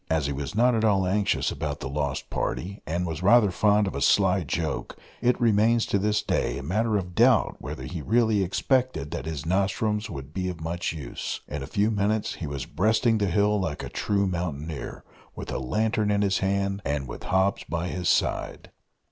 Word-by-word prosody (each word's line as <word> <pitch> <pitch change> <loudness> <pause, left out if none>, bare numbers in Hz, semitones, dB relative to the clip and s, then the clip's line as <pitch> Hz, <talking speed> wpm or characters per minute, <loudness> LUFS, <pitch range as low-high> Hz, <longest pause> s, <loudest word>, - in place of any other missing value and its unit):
As 80 -3 +1
he 70 - -1
was 70 +6 -5
not 125 +3 +4
at 110 -1 +1
all 100 -4 +3
anxious 100 +2 +1
about - - -4
the - - -5
lost 70 0 -3
party, 100 +4 -3
and 85 +3 -1
was 80 -1 -4
rather 105 +1 +5
fond 105 +3 +3
of 95 - -3
a - - -4
sly 95 -2 +3
joke, 80 -1 -3 0.2
it 125 +1 +2
remains 115 0 +3
to 100 - 0
this 105 +1 +1
day - - 0
a 70 - -6
matter 105 +7 +1
of 90 -2 -4
doubt - - +4
whether 65 - -6
he 80 +5 -5
really 110 +3 +2
expected 125 - 0
that - - -4
his 75 -4 -4
nostrums 105 +4 0
would 70 -3 -8
be 90 +1 -2
of 90 -3 -6
much 85 +2 -2
use. 75 -7 -5
In 75 - -5
a 65 - -6
few 105 +2 +1
minutes 105 +1 0
he 80 - -6
was 70 -2 -4
breasting 110 +4 +2
the 100 - +1
hill 105 +3 +2
like 80 -6 -3
a - - -5
true 100 -1 0
mountaineer, 85 -5 -4 0.3
with - - -6
a - - -2
lantern 110 - 0
in 105 0 +2
his 100 -1 +1
hand, 100 +1 0
and 70 -1 -2
with - - -8
Hobbs 95 +1 +1
by 85 +1 -3
his 90 -1 -1
side. - - 0
95 Hz, 205 wpm, -26 LUFS, 80-105 Hz, 0.3 s, rather